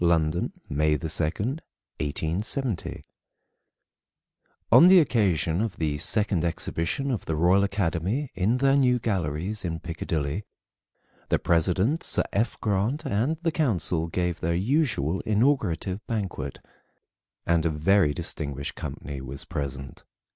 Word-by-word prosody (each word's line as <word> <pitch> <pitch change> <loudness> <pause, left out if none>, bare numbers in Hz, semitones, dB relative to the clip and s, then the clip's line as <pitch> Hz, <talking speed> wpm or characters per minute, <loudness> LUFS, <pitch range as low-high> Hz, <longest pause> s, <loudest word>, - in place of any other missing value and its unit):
LONDON, 85 -1 +2 0.2
MAY 75 +1 +1
2, - - -14
1870. 95 - -3 1.7
[On 170 - +9
the 185 0 +8
occasion 95 - +1
of 110 -3 -3
the 75 -3 -1
Second 100 -1 +1
Exhibition 85 +9 -1
of 115 - -3
the 80 - -1
Royal 90 +5 +4
Academy 100 - -1
in 105 +6 +1
their 135 +1 +3
new 125 -3 +4
galleries 95 -2 -2
in 85 -2 -3
Piccadilly, 80 +1 -3 0.9
the - - +3
President, 95 - +1
Sir - - +1
F. 110 +3 0
Grant, 110 +9 0
and 130 +6 0
the 165 - +2
council 90 - +1
gave 90 0 -2
their 85 +1 0
usual 95 - +1
inaugurative 105 - +1
banquet, 95 - -3 0.9
and 85 -1 +2
a 85 - +2
very 80 +2 +3
distinguished 70 -1 -3
company 70 0 -6
was 65 +1 -5
present. 70 -1 -5
90 Hz, 120 wpm, -26 LUFS, 80-115 Hz, 1.7 s, On